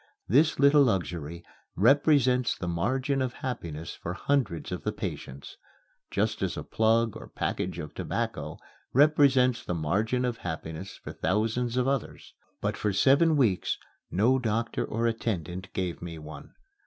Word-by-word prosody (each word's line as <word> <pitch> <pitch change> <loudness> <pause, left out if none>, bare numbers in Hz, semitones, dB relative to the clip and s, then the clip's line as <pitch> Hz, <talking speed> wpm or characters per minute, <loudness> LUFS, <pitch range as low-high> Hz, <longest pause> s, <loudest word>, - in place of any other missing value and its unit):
This 150 - +4
little 140 +1 +6
luxury 85 - -1 0.3
represents 130 - +4
the 90 - -4
margin 130 - 0
of 130 -2 -1
happiness 85 - -4
for 85 +2 -6
hundreds 130 - -1
of - - -3
the - - -1
patients, 70 +2 -7 0.5
just - - -1
as - - -1
a - - -4
plug 115 0 +2
or - - -9
package 90 -2 -3
of 75 -3 -6
tobacco - - -3 0.4
represents 135 -4 +4
the 90 - -3
margin 105 +11 0
of 120 -2 -2
happiness 80 +1 -6
for - - -8
thousands 115 +6 0
of 125 0 +2
others; 135 -3 -3 0.3
but - - -1
for 105 - -1
seven 140 - +4
weeks 110 -10 +2 0.3
no 120 +8 +3
doctor 115 -1 -1
or 115 +2 -2
attendant 95 -6 -2
gave 90 -3 -3
me 85 -1 -6
one. 75 -2 -11
115 Hz, 145 wpm, -28 LUFS, 85-130 Hz, 0.5 s, little